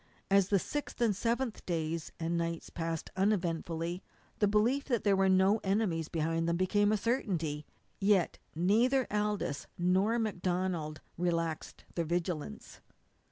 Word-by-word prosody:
As 195 -1 +5
the 200 - +3
sixth 290 +10 -4
and 235 -3 +3
the - - -9
seventh 235 +1 -1
days 165 -1 -2
and 165 +1 -1
nights 170 -1 -2
passed 165 -1 -3
uneventfully 175 -3 0 0.4
the 205 - +4
belief 230 +7 +2
that 240 -5 0
there 200 -2 +4
were 190 0 +3
no 190 +3 +4
enemies 190 -5 0
behind 165 +1 0
them 170 - +1
became 205 +3 +3
a 215 - +3
certainty. 175 - -1 0.3
Yet 195 -3 +2 0.2
neither 235 - +3
Aldous 210 -8 -1
nor 190 +6 +2
MacDonald 180 -7 -1 0.2
relaxed 165 -2 -2
their 170 - -1
vigilance. 175 +4 -3
185 Hz, 140 wpm, -32 LUFS, 165-210 Hz, 0.4 s, As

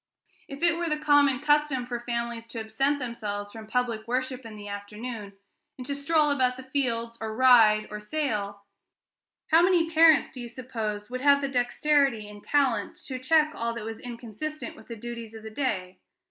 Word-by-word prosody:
If 275 +3 -8
it 335 -1 +5
were 340 -1 -1
the 305 - 0
common 285 -3 +4
custom 295 -4 +2
for 245 -1 -4
families 235 -1 -4
to 230 0 -6
absent 270 +7 0
themselves 210 -5 -5
from 220 0 -10
public 230 -2 -1
worship 255 0 -2
in 220 - -10
the 205 -1 -9
afternoon, 205 +1 -7 0.4
and 255 - -7
to 280 - -2
stroll 300 +1 +2
about 255 -3 +1
the 260 - -8
fields, 235 -4 -2
or 220 -1 -4
ride, 225 -4 +6
or 210 - -5
sail, 210 -5 -3 0.9
how 325 +1 +7
many 345 -2 +3
parents, 320 -2 +6
do 255 - -8
you 240 - -7
suppose, 225 -4 -5
would 255 0 -4
have 280 0 +5
the 275 -1 -2
dexterity 260 -2 +1
and 205 0 -12
talent 275 -5 +1
to 260 -2 -5
check 305 +3 +3
all 230 -2 -3
that 225 -2 -6
was 225 0 -6
inconsistent 245 +7 -6
with - - -16
the 230 - -6
duties 230 0 -7
of 220 - -10
the 220 - -8
day? 190 -8 -3
245 Hz, 190 wpm, -27 LUFS, 220-285 Hz, 0.9 s, how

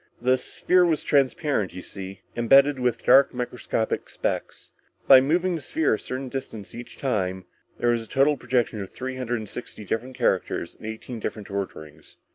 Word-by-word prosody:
The 130 +2 +2
sphere 180 0 +2
was 165 -3 +1
transparent, 140 - +1
you 90 - -7
see, 95 -1 -8
imbedded 135 +4 +5
with 125 -2 0
dark 135 -1 +6
microscopic 125 -2 -2
specks. - - -4 0.4
By 130 -1 +9
moving 175 +6 +1
the 160 - -5
sphere 155 +1 +1
a 110 - -1
certain 130 +1 -5
distance 120 -6 -6
each 120 0 -9
time, 95 -8 -1 0.3
there 120 - +1
was 120 -1 0
a 115 - -11
total 140 +5 +3
projection 120 -4 -1
of 95 - -6
three 130 0 -6
hundred 120 -1 -2
and 110 -1 -6
sixty 110 -1 -8
different 125 +6 -3
characters 85 - 0
in 110 - -10
eighteen 110 +2 -6
different 105 -1 -5
orderings. 95 -6 -6
125 Hz, 175 wpm, -25 LUFS, 110-135 Hz, 0.4 s, By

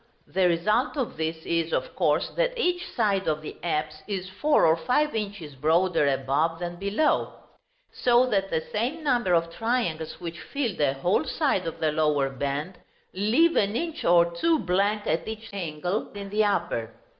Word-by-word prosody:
The 185 -1 +2
result 210 - +1
of 260 -4 -2
this 160 +1 -2
is, 165 -1 0
of - - -2
course, - - +1
that - - -1
each 355 -5 0
side 200 -4 0
of 155 -1 0
the - - -7
apse 155 -2 -2
is 190 -3 -3
four 295 +11 +3
or 160 0 +5
five 250 - +1
inches 200 -8 -4
broader 160 +3 +2
above 140 +4 +1
than 175 0 -5
below; 200 - +1 0.6
so 245 0 +3
that 195 -5 0
the 160 -3 0
same 255 +10 -2
number 240 -10 +2
of 165 0 0
triangles 225 -9 -2
which 170 -1 -6
filled 245 - -3
a 140 -2 +3
whole 175 +8 +1
side 235 - 0
of 165 - -5
the 155 -1 +1
lower 150 -3 +1
band, 140 +6 -3 0.3
leave 235 - +3
an 205 +1 +2
inch 325 +4 -3
or 170 0 +5
two 325 - +2
blank 200 - 0
at 160 - -1
each 220 +1 -7
angle 180 +2 -3
in 200 -1 -7
the 215 +1 +2
upper. 170 - -1
185 Hz, 175 wpm, -26 LUFS, 160-225 Hz, 0.6 s, or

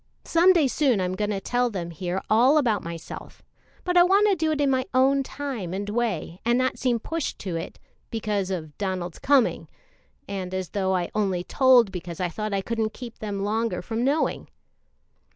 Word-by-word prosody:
Some 340 +3 +5
day 330 -6 +4
soon 260 -4 +2
I'm 185 0 -1
going 210 +2 -2
to 200 -2 -1
tell 245 +5 0
them 175 -6 -5
here 180 +3 -3
all 245 +7 +5
about 230 -9 +2
myself, 170 0 -8 0.4
but 360 0 -1
I - - +9
want 390 +4 +5
to 395 - +3
do 315 -2 0
it 305 - -1
in 280 -2 +3
my 260 -1 +2
own 270 +2 +4
time 260 -10 -5
and 200 +1 -4
way, 205 -6 -2
and 235 +1 +2
not 255 0 0
seem 250 -2 +1
pushed 325 +6 -3
to 185 -4 -4
it 165 - -5 0.3
because 210 -4 -2
of 155 -6 -5
Donald's 185 -3 -3
coming, 275 -3 +2 0.6
and 185 -2 -4
as 185 -2 -3
though 190 -2 0
I 175 -1 -2
only 195 -4 0
told 250 -2 +4
because 175 -2 -7
I 180 -1 0
thought 215 +5 -4
I 195 -1 0
couldn't 220 +1 -2
keep 240 -2 -9
them 200 -2 -3
longer 215 -3 -1
from 225 +3 -2
knowing." 285 +4 0
215 Hz, 195 wpm, -25 LUFS, 185-260 Hz, 0.6 s, I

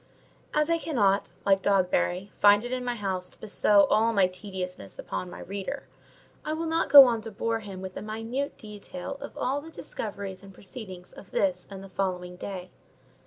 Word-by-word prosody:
As 300 +2 +2
I 335 - +2
cannot, 205 -12 +1
like 195 -1 +4
Dogberry, 190 0 +1
find 205 +2 +6
it 245 - -5
in 255 -1 -2
my 245 -1 -1
heart 195 -4 -2
to - - -9
bestow 205 -1 +4
all 225 +2 +4
my 200 -3 +5
tediousness 185 - -6
upon 180 - -4
the - - -8
reader, 200 +9 -5 0.6
I 305 - -2
will 325 +1 -2
not 325 -1 0
go 280 -1 +12
on 235 -3 +1
to 225 - -6
bore 225 +2 -1
him 195 -3 -8
with 185 -1 -7
a - - -5
minute 225 +6 -3
detail 210 +4 -8
of 285 - -8
all 275 +3 0
the 320 - -11
discoveries 200 - -5
and 195 -1 -13
proceedings 190 -4 -8
of 195 - -13
this 185 -2 0
and 195 -1 -8
the 195 - -10
following 180 -2 -2
day. 185 0 -7
205 Hz, 190 wpm, -28 LUFS, 190-245 Hz, 0.6 s, go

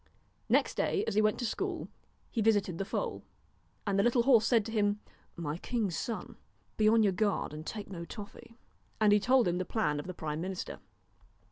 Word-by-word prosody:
Next - - +3
day 410 +1 0
as - - -1
he 215 - +4
went 215 0 +2
to 245 - -2
school 225 - -2 0.4
he 230 - 0
visited 205 -5 +2
the 195 - -1
foal. - - -3 0.6
And 200 -1 +1
the - - +4
little 240 0 +3
horse 235 -4 +5
said 230 -4 +3
to 225 - -5
him: 205 -2 +1 0.2
' - - -35
My 150 +3 -2
king's 210 -7 -1
son, 230 +5 -4 0.4
be 215 0 +4
on 225 0 +5
your 200 -2 +3
guard, 205 -5 0
and 155 +1 -6
take 210 -2 -5
no 180 -4 -6
toffee,' 210 +4 -10 0.4
and 210 -1 +5
he 210 - +5
told 255 +1 +4
him 175 +1 0
the - - 0
plan 175 -8 0
of 145 - -6
the 185 - -6
prime 155 -1 -3
minister. 185 +1 -5
210 Hz, 210 wpm, -31 LUFS, 185-225 Hz, 0.6 s, horse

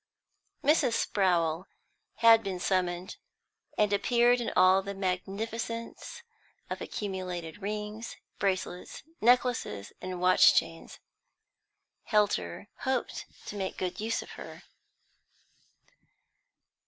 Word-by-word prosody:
Mrs. 290 -4 +3
Sprowl 175 -6 +1 0.5
had 230 -1 +7
been 190 -2 -3
summoned, 180 -1 -1 0.6
and 210 -1 +3
appeared 240 +3 +3
in 235 - -2
all 185 +1 +6
the 200 +1 -6
magnificence 225 - -4 0.5
of - - -4
accumulated 185 -3 -5
rings, 210 +2 -5 0.2
bracelets, 185 0 -2 0.2
necklaces, 245 - +2
and 185 -1 -5
watch 185 +1 +6
chains. - - -1 1.1
Helter 200 - 0
hoped 260 -2 -2 0.2
to - - -6
make 190 -2 -3
good 180 -1 -3
use 225 +2 -1
of - - -13
her. - - -10
200 Hz, 95 wpm, -29 LUFS, 185-230 Hz, 1.1 s, had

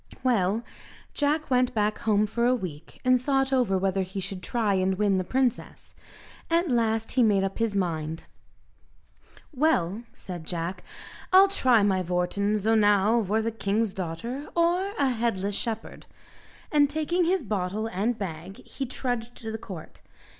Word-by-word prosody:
Well, 220 -3 +1 0.5
Jack 300 0 0
went 250 -1 +2
back 210 0 +1
home 215 -1 +2
for 235 +3 -2
a 250 +1 +4
week, 165 -8 -8
and 255 -1 +4
thought 270 0 +1
over 240 -8 +2
whether 195 0 0
he 190 +1 -4
should 195 -1 -5
try 220 0 0
and 190 0 +1
win 200 -2 +2
the - - -1
princess. 255 +4 -2 0.6
At 335 -2 +2
last 225 -2 +1
he 255 - +2
made 205 -4 +4
up 195 +2 -3
his 225 -3 0
mind. 165 -4 -2 1.3
"Well," 230 - +1
said 175 -3 -8
Jack, 175 +2 -4 0.5
"I'll 385 +1 +7
try 255 - +4
my 190 -2 +2
vorton; 180 +4 0
zo 215 +2 +1
now 210 +1 +4
vor 215 +2 0
the 230 - -1
king's 215 -1 -1
daughter, 230 - -5
or 350 +3 +2
a 275 -2 +2
headless 220 -5 -1
shepherd!" 225 +2 -5 0.6
And 290 -2 +4
taking 315 +4 0
his 365 -1 +1
bottle 205 0 -2
and 225 +2 -1
bag, 185 -1 -7
he 270 - -5
trudged 245 -2 -3
to 225 -1 -6
the 220 - -5
court. 185 -8 -10
220 Hz, 160 wpm, -26 LUFS, 190-255 Hz, 1.3 s, I'll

